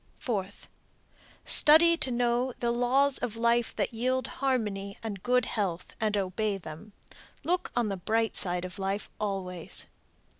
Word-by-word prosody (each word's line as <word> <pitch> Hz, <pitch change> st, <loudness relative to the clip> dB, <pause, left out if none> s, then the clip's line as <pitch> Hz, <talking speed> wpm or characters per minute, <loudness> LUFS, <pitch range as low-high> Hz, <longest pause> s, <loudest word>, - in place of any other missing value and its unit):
Fourth. 200 Hz, -5 st, -4 dB, 0.8 s
Study 335 Hz, +3 st, +7 dB
to 300 Hz, -, -1 dB
know 245 Hz, +1 st, 0 dB
the 235 Hz, -1 st, 0 dB
laws 260 Hz, +3 st, +2 dB
of 230 Hz, -3 st, -3 dB
life 235 Hz, 0 st, +1 dB
that -, -, -1 dB
yield 255 Hz, +2 st, 0 dB, 0.2 s
harmony 210 Hz, -7 st, -1 dB
and 205 Hz, -4 st, -5 dB
good 250 Hz, +1 st, +2 dB
health 190 Hz, -7 st, -3 dB
and 210 Hz, -1 st, +1 dB
obey 200 Hz, +2 st, -1 dB
them. 180 Hz, +4 st, -10 dB, 0.5 s
Look 355 Hz, +4 st, -1 dB
on 235 Hz, -3 st, +1 dB
the 195 Hz, -, -3 dB
bright 225 Hz, +4 st, 0 dB
side 180 Hz, -1 st, -1 dB
of 185 Hz, +2 st, -8 dB
life 195 Hz, +2 st, -3 dB
always. 185 Hz, -4 st, -4 dB
225 Hz, 145 wpm, -28 LUFS, 195-245 Hz, 0.8 s, Study